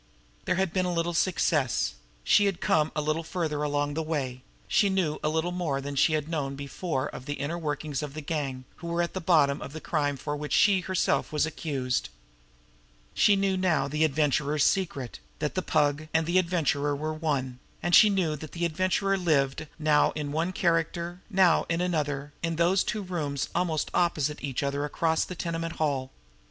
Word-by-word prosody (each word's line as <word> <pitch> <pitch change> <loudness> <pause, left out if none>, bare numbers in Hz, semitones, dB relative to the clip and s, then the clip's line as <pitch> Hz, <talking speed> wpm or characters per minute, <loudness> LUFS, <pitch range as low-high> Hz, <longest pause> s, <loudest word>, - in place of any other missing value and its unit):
There - - +1
had 190 -2 0
been 185 -1 +1
a - - 0
little 170 0 -1
success; 155 - +1 0.3
she 205 - +5
had 195 -4 -1
come 155 0 +2
a 150 - 0
little 155 +2 0
farther 160 -3 -2
along 145 0 0
the 160 - -1
way; 140 -6 -3 0.3
she 200 - +3
knew 185 -6 0
a 150 - +2
little 160 +3 0
more 170 -6 -1
than 140 +1 -5
she 150 +3 +3
had 155 -1 0
known 145 -4 -2
before 140 +1 -3
of 130 - -9
the 145 - -2
inner 145 +5 -3
workings 150 -2 -3
of 145 -1 -6
the 155 - -4
gang 140 -4 -3
who 170 - -8
were 170 +1 0
at 170 - -4
the 190 - -3
bottom 150 -5 +3
of 140 - -7
the 160 - -6
crime 145 -3 -1
of 145 -1 -2
which 150 0 -4
she 200 -3 +5
herself 185 0 0
was 150 -1 +2
accused. 140 -5 -2 1.0
She 205 - +5
knew 195 -1 +1
now 180 -7 +1
the 150 +2 0
Adventurer's 150 -1 +2
secret, 150 -10 0 0.2
that 150 -1 -2
the 185 - -1
Pug 150 -2 +1
and 160 0 +3
the 175 +3 +3
Adventurer 150 -5 0
were 155 +2 -3
one; 140 -6 -2 0.2
and 175 +1 -1
she 215 - +9
knew 190 -5 +1
where 150 - -3
the 160 +3 -4
Adventurer 185 +4 +1
lived, 150 -3 +1
now 150 -2 +3
in 150 -2 -4
one 165 +4 0
character, 170 0 -1
now 185 -4 +4
in 170 0 0
the - - 0
other, 145 -1 -2
in 165 -1 -1
those 175 +3 +3
two 215 -3 -3
rooms 150 -7 -3
almost 165 -4 0
opposite 155 -4 0
each 140 -1 -2
other 140 +1 -1
across 160 +2 +1
that 180 - -8
tenement 165 -1 -3
hall. 140 -4 -1
155 Hz, 195 wpm, -27 LUFS, 145-175 Hz, 1.0 s, she